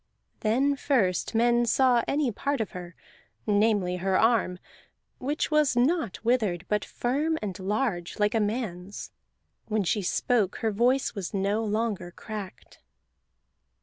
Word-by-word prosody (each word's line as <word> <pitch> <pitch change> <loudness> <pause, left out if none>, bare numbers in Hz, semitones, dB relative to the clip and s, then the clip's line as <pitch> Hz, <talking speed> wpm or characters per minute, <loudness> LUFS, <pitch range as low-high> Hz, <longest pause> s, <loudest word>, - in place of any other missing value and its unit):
Then 260 +6 +2
first 230 -9 0
men 240 +1 +3
saw 250 0 +4
any 280 -3 +1
part 280 +6 -2
of 220 -5 -2
her, 175 -2 -8 0.5
namely 205 -4 +2
her 190 +1 +1
arm, 225 -6 +2 0.6
which 290 +4 -2
was 300 -4 +3
not 245 - 0
withered, 210 -7 +1
but 210 0 0
firm 295 +6 -1
and 205 -2 -5
large, 195 -3 -2
like 210 0 +2
a 225 - +2
man's. 205 -4 -3 0.6
When 215 -2 0
she 205 +4 0
spoke 200 +2 +1
her 225 -2 -1
voice 245 +6 +2
was 200 -2 -5
no 200 +3 0
longer 215 -4 -1
cracked. 200 +1 -9
220 Hz, 135 wpm, -27 LUFS, 195-245 Hz, 0.6 s, saw